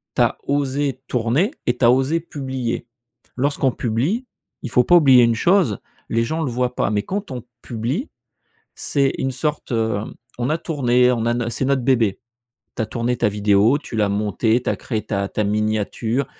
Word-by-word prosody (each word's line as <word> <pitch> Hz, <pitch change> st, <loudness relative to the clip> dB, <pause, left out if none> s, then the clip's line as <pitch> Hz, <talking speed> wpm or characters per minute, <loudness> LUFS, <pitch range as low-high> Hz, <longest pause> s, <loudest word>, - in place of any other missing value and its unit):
Tu -, -, +2 dB
as -, -, +2 dB
osé 140 Hz, -1 st, -1 dB
tourner 125 Hz, -, +1 dB
et 120 Hz, 0 st, +1 dB
tu 125 Hz, -, -3 dB
as 120 Hz, -, +7 dB
osé 135 Hz, +6 st, +1 dB
publier.» 130 Hz, -7 st, -4 dB, 0.5 s
Lorsqu'on 135 Hz, 0 st, +1 dB
publie, 135 Hz, -, -1 dB, 0.4 s
il 125 Hz, -, -5 dB
faut 125 Hz, -, +4 dB
pas 175 Hz, -, +5 dB
oublier 135 Hz, -7 st, +7 dB
une 115 Hz, -1 st, +3 dB
chose, 170 Hz, -, +2 dB, 0.3 s
les 115 Hz, 0 st, +1 dB
gens 160 Hz, +7 st, -2 dB
le 145 Hz, -, -1 dB
voient 125 Hz, +1 st, -1 dB
pas, -, -, 0 dB
mais 105 Hz, -1 st, 0 dB
quand 200 Hz, -, -4 dB
on 125 Hz, -3 st, -5 dB, 0.2 s
publie, 125 Hz, -, -3 dB, 0.6 s
c'est 140 Hz, -2 st, 0 dB
une 135 Hz, -, -1 dB
sorte, 145 Hz, 0 st, -3 dB
heu, 110 Hz, -2 st, 0 dB, 0.4 s
on 125 Hz, +3 st, -1 dB
a 155 Hz, -, +1 dB
tourné 125 Hz, -6 st, +2 dB
on 115 Hz, -2 st, -1 dB
a 120 Hz, -, +2 dB
no 120 Hz, -1 st, -1 dB
c'est 130 Hz, -, -2 dB
notre 135 Hz, -1 st, +1 dB
bébé, 120 Hz, -6 st, +2 dB, 0.6 s
tu -, -, 0 dB
as 110 Hz, -, 0 dB
tourné 120 Hz, +1 st, -2 dB
ta 120 Hz, -, +2 dB
vidéo, 105 Hz, +4 st, +3 dB
tu 130 Hz, -6 st, -7 dB
l'as 105 Hz, -2 st, +2 dB
montée, 110 Hz, +3 st, +1 dB
tu -, -, -1 dB
as -, -, 0 dB
créé 110 Hz, -4 st, -3 dB
ta 100 Hz, -2 st, -1 dB
ta 105 Hz, -, -1 dB
miniature, 110 Hz, +4 st, -1 dB
125 Hz, 195 wpm, -21 LUFS, 115-140 Hz, 0.6 s, as